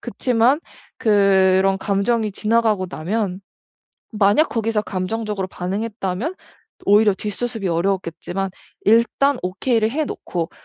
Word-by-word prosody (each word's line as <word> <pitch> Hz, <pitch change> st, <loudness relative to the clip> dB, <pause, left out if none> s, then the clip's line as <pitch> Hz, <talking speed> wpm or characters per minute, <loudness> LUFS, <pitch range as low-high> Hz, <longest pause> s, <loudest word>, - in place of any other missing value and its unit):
그치만 250 Hz, +6 st, +1 dB, 0.4 s
그런 195 Hz, -3 st, +3 dB
감정이 210 Hz, +3 st, 0 dB
지나가고 215 Hz, -3 st, +1 dB
나면 185 Hz, +3 st, -3 dB, 0.7 s
만약 210 Hz, +9 st, +3 dB
거기서 225 Hz, -2 st, -1 dB
감정적으로 200 Hz, 0 st, -3 dB
반응했다면 200 Hz, -, -3 dB, 0.5 s
오히려 205 Hz, 0 st, +5 dB
뒷수습이 210 Hz, 0 st, -3 dB
어려웠겠지만 185 Hz, +1 st, -2 dB, 0.3 s
일단 235 Hz, +5 st, +3 dB
오케이를 220 Hz, +4 st, 0 dB
해 305 Hz, +5 st, -1 dB
놓고 175 Hz, -, -4 dB
210 Hz, 285 characters per minute, -21 LUFS, 190-230 Hz, 0.7 s, 오히려